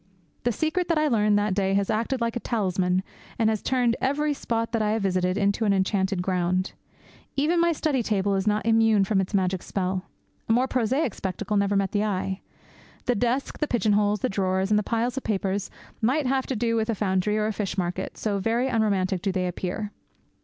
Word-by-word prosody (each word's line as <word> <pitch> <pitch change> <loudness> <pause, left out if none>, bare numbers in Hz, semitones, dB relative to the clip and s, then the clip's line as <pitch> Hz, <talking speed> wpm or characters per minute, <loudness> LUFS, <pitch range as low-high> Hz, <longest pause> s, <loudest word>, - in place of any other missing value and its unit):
The 240 - +3
secret 315 - -1
that 335 - +2
I 305 0 +3
learned 210 -5 +3
that 205 -1 +1
day 195 0 +1
has 200 -1 +1
acted 235 +4 -1
like 230 0 0
a - - 0
talisman, 185 -5 0 0.3
and 220 -1 +3
has 215 -3 -2
turned 245 -3 +1
every 295 +3 +1
spot 230 -4 -2
that 230 -1 0
I 210 0 +1
have 220 -2 -1
visited 185 -1 +1
into 200 +2 +1
an 205 -2 +3
enchanted 190 -1 0
ground. 185 0 0 0.6
Even 315 +5 +2
my 340 0 +4
study 300 -4 0
table 205 -3 0
is 195 +1 0
not 210 +1 +1
immune 225 -2 +4
from 195 0 +2
its 190 +2 -3
magic 185 -1 +1
spell. 185 -1 -2 0.4
A - - +5
more 250 +3 +3
prosaic 255 0 0
spectacle 190 +2 -3
never 200 0 +2
met 195 -1 +1
the 205 0 +1
eye. 190 -2 -2 0.6
The 250 - +2
desk, 245 +4 -1
the 300 - 0
pigeon 225 -5 +1
holes, 205 0 +2
the - - +2
drawers, 190 0 0
and 210 - +5
the - - +1
piles 235 +4 -1
of 270 - -2
papers 195 -1 -1 0.3
might 265 +6 +2
have 265 0 0
to 265 - -2
do 230 +1 0
with 220 0 0
a 230 - +1
foundry 195 +1 0
or 215 - +1
a 215 - -1
fish 195 -3 -3
market, 180 0 -3
so 205 -2 -1
very 230 +6 +1
unromantic 200 -6 +1
do 195 - 0
they 185 -1 -1
appear. 185 +4 -3
210 Hz, 215 wpm, -25 LUFS, 190-235 Hz, 0.6 s, A